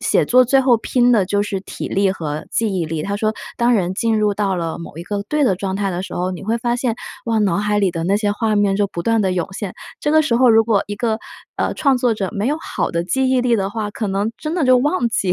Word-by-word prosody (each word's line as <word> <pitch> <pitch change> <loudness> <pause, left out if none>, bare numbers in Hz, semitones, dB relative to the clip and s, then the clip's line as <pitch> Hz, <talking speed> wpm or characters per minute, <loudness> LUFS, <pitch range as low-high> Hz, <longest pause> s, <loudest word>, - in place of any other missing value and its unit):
写 - - +2
作 255 +1 +5
最 270 +2 +3
后 255 -2 +4
拼 245 +2 +2
的 220 -5 +4
就 205 +2 +1
是 200 -2 -3
体 190 - -7
力 195 0 +2
和 155 -4 -5
记 225 -1 0
忆 170 - 0
力。” 155 -1 -3
他 200 +3 -2
说： 215 +1 0 0.2
“当 240 0 +2
人 185 -4 0
进 225 +2 +1
入 210 -1 +2
到 200 -2 0
了 165 -2 -3
某 165 -2 -9
一 - - -5
个 200 +3 -3
对 300 0 +1
的 195 -8 +2
状 190 0 -3
态 200 0 -1
的 180 0 -3
时 190 - -7
候， 180 +1 -1
你 180 - -7
会 225 +3 0
发 240 0 0
现， 245 -2 -1 0.3
哇， 225 -1 +1
脑 200 -4 +2
海 210 0 0
里 195 -2 +2
的 165 -1 -4
那 195 +3 +2
些 205 -1 0
画 215 0 0
面 205 -1 +2
就 205 0 +2
不 175 -3 -6
断 225 +3 +2
地 190 -2 +1
涌 180 -2 -1
现。 195 -1 -5 0.3
这 295 - 0
个 315 - +5
时 250 -6 +1
候 255 +1 +5
如 225 0 +6
果 215 -3 +2
一 205 - -4
个， 220 +1 -1 0.4
呃， - - -1
创 275 -3 +2
作 245 -2 +2
者 195 -3 -2
没 210 0 -2
有 295 +4 +1
好 - - -2
的 170 - -1
记 260 +10 0
忆 260 -1 +3
力 245 -2 +2
的 195 -1 -1
话， 210 -1 -3
可 215 +1 -4
能 200 +3 -1
真 310 +1 -4
的 345 -5 +1
就 255 -1 +5
忘 275 -2 +1
记 195 -5 0
210 Hz, 310 characters per minute, -19 LUFS, 195-240 Hz, 0.4 s, 如